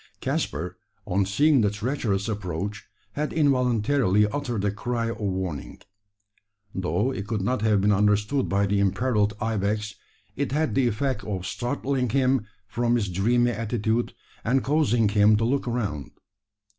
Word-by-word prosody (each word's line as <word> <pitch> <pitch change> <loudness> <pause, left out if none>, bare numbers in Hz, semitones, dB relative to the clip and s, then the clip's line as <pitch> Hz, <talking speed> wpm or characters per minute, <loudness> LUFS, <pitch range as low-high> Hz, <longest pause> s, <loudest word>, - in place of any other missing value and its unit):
Caspar, 80 +6 -2 0.3
on 95 +1 0
seeing 145 +6 +4
the 105 - +3
treacherous 105 -2 -2
approach, 100 -1 -4 0.3
had 150 +6 -2
involuntarily 125 - +2
uttered 120 -3 -2
a 100 - +2
cry 115 +2 -2
of - - -7
warning. 95 -7 -3 0.9
Though 95 +7 0
it 100 -6 -5
could 110 -2 -1
not 125 +2 0
have 105 -2 +3
been 105 +1 +3
understood 105 +6 +2
by 100 +1 +2
the 100 0 +1
imperilled 105 +1 +1
ibex, 105 -1 -1 0.4
it 140 0 -2
had 155 +1 +1
the 130 -2 +2
effect 120 0 -1
of 95 -3 -4
startling 130 +1 -2
him 130 -2 +1 0.2
from 120 +3 0
his 105 -5 0
dreamy 120 +7 +2
attitude, 115 +1 -1 0.3
and 130 +3 +1
causing 130 -7 +2
him 105 +1 +4
to 115 - 0
look 135 +2 0
around. 105 - -2
110 Hz, 145 wpm, -25 LUFS, 100-125 Hz, 0.9 s, seeing